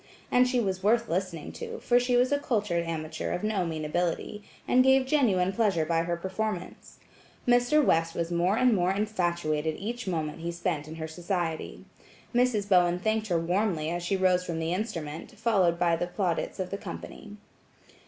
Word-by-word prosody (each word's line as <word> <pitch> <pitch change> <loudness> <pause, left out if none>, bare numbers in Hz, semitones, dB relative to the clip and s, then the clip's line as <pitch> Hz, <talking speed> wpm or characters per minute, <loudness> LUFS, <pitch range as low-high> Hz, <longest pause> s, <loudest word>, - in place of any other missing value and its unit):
And 250 0 +5
she 250 -1 +1
was 190 -4 -1
worth 230 +4 +2
listening 175 -2 -3
to 465 -1 -7
for 245 - +3
she 245 0 +2
was 250 +2 +3
a 285 - +2
cultured 205 -10 -1
amateur 160 -1 -4
of 180 - -3
no 205 -5 0
mean 155 -2 -4
ability, 175 +5 -2 0.3
and 255 0 +5
gave 265 0 +4
genuine 205 -10 +2
pleasure 195 -8 +1
by 165 +1 +1
her 170 0 -1
performance. 190 +1 -5 0.5
Mr. 245 +5 +4
West 165 0 +2
was 170 0 -2
more 175 +4 +2
and 250 -1 +4
more 180 -2 +2
infatuated 175 -7 -1
each 235 +2 -5
moment 160 -3 -2
he 170 +1 -3
spent 170 -3 -2
in 160 - -8
her 160 -1 -5
society. 170 0 -3 0.5
Mrs. 240 -4 +2
Bowen 180 -3 +4
thanked 220 +3 -1
her 175 -4 +1
warmly 170 -2 0
as 175 0 -2
she 185 +3 0
rose 185 -1 +3
from 170 -2 -4
the 165 +1 -1
instrument, 170 -1 -5
followed 200 -6 +2
by 170 -1 +2
the 175 +1 -2
plaudits 180 0 -2
of 185 -1 -3
the 200 - -3
company. 210 0 -9
185 Hz, 185 wpm, -28 LUFS, 170-220 Hz, 0.5 s, And